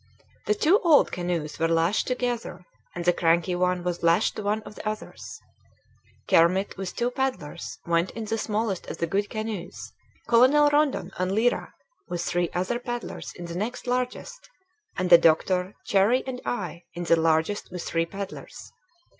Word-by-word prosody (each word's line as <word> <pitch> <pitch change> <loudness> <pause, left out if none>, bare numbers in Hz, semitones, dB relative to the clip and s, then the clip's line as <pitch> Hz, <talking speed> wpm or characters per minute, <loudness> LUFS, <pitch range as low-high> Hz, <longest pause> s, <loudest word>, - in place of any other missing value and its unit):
The 425 - +3
two 400 +1 +4
old 325 -6 +4
canoes 175 -4 -3
were 165 - +2
lashed 165 +5 +1
together, 245 -6 -3 0.3
and 175 -1 -4
the 175 - +5
cranky 170 +1 +2
one 180 0 0
was 175 -1 -2
lashed 170 +5 +3
to - - -4
one 210 +1 -1
of - - -10
the 215 - -4
others. 215 0 -7 0.9
Kermit 180 +4 +3
with 190 -1 -5
two 240 +1 0
paddlers 245 - -3
went 170 +1 +1
in 225 - -4
the 225 +1 -2
smallest 215 -3 -2
of - - -6
the - - 0
good 200 +5 -1
canoes; 215 -5 -5 0.3
Colonel 265 +5 +5
Rondon 290 -10 +1
and 185 +1 0
Lyra 235 +3 0 0.3
with 175 -1 -2
three 175 -1 0
other 185 +7 -1
paddlers 240 -1 -5
in 175 - -8
the 170 - -6
next 220 +7 -4
largest; 250 - -3 0.5
and 180 -1 -1
the 170 - +10
doctor, 180 +4 +2
Cherrie, 205 +6 +3
and 255 -1 -5
I 180 -7 -3
in 175 - -4
the 170 - +4
largest 160 +4 +1
with 180 -1 -6
three 165 0 -1
paddlers. 195 +2 -8
195 Hz, 170 wpm, -26 LUFS, 175-240 Hz, 0.9 s, the